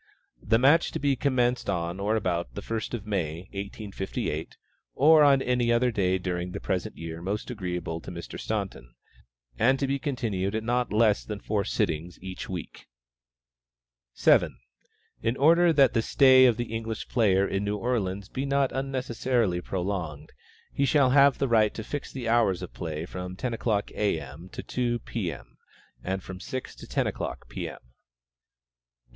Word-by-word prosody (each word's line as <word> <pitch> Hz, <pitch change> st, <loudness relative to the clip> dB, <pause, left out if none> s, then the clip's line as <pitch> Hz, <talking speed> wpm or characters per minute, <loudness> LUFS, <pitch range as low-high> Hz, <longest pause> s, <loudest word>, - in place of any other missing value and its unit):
The 110 Hz, +2 st, +3 dB
match 145 Hz, +7 st, +4 dB
to -, -, -2 dB
be 140 Hz, -1 st, +2 dB
commenced 125 Hz, -2 st, +1 dB
on 85 Hz, +1 st, -2 dB
or 105 Hz, +3 st, +1 dB
about 90 Hz, -5 st, -1 dB
the 100 Hz, -, -5 dB
first 115 Hz, +2 st, -3 dB
of 110 Hz, -3 st, -7 dB
May, 85 Hz, -6 st, -2 dB
1858, 100 Hz, -5 st, -4 dB, 0.4 s
(or 155 Hz, +3 st, +6 dB
on 140 Hz, -2 st, +5 dB
any 125 Hz, -1 st, +1 dB
other 120 Hz, +1 st, +3 dB
day 95 Hz, -4 st, +1 dB
during 90 Hz, -1 st, -3 dB
the -, -, -4 dB
present 90 Hz, -2 st, -3 dB
year 80 Hz, 0 st, -6 dB
most 100 Hz, +6 st, -3 dB
agreeable 90 Hz, -6 st, -4 dB
to -, -, -9 dB
Mr. 85 Hz, -2 st, -7 dB
Staunton,) 95 Hz, -, -4 dB, 0.6 s
and 130 Hz, +3 st, +4 dB
to 140 Hz, -, 0 dB
be 140 Hz, +1 st, -1 dB
continued 110 Hz, -9 st, -2 dB
at 110 Hz, -, -1 dB
not 120 Hz, +1 st, 0 dB
less 105 Hz, -1 st, +3 dB
than 105 Hz, -2 st, -6 dB
four 105 Hz, 0 st, -1 dB
sittings 85 Hz, -1 st, -2 dB
each 95 Hz, -1 st, -7 dB
week. 90 Hz, -2 st, -7 dB, 1.3 s
7. -, -, +4 dB, 0.6 s
In 115 Hz, +3 st, 0 dB
order 170 Hz, +4 st, +5 dB
that 140 Hz, -4 st, +5 dB
the 115 Hz, -, +2 dB
stay 130 Hz, +1 st, +6 dB
of 120 Hz, -3 st, +2 dB
the 120 Hz, -2 st, -4 dB
English 115 Hz, 0 st, -4 dB
player 100 Hz, -5 st, +3 dB
in 95 Hz, +1 st, -1 dB
New 105 Hz, 0 st, -1 dB
Orleans 100 Hz, -4 st, -2 dB
be 130 Hz, +5 st, -4 dB
not 140 Hz, -1 st, +2 dB
unnecessarily 125 Hz, -7 st, -1 dB
prolonged, 90 Hz, -5 st, -4 dB, 0.4 s
he 140 Hz, -, 0 dB
shall 140 Hz, -1 st, +4 dB
have 140 Hz, 0 st, +6 dB
the 135 Hz, -, 0 dB
right 110 Hz, -3 st, +3 dB
to 110 Hz, -, -5 dB
fix 145 Hz, +5 st, -5 dB
the 125 Hz, -3 st, -5 dB
hours 115 Hz, -6 st, +2 dB
of -, -, -8 dB
play 80 Hz, +4 st, -4 dB
at 85 Hz, -, -9 dB
from 90 Hz, 0 st, -6 dB
ten 120 Hz, +5 st, -3 dB
o'clock, 110 Hz, -3 st, -1 dB
A. 105 Hz, -6 st, 0 dB
M., 75 Hz, +6 st, -10 dB
to -, -, -7 dB
two, 120 Hz, -1 st, -1 dB
P. 110 Hz, -6 st, -3 dB
M., -, -, -12 dB, 0.5 s
and 95 Hz, 0 st, -3 dB
from 95 Hz, -1 st, -8 dB
six 130 Hz, +6 st, -5 dB
to -, -, -11 dB
ten -, -, 0 dB
o'clock, -, -, -4 dB
P. -, -, -4 dB
M. -, -, -9 dB
8. -, -, -17 dB
110 Hz, 175 wpm, -27 LUFS, 90-125 Hz, 1.3 s, or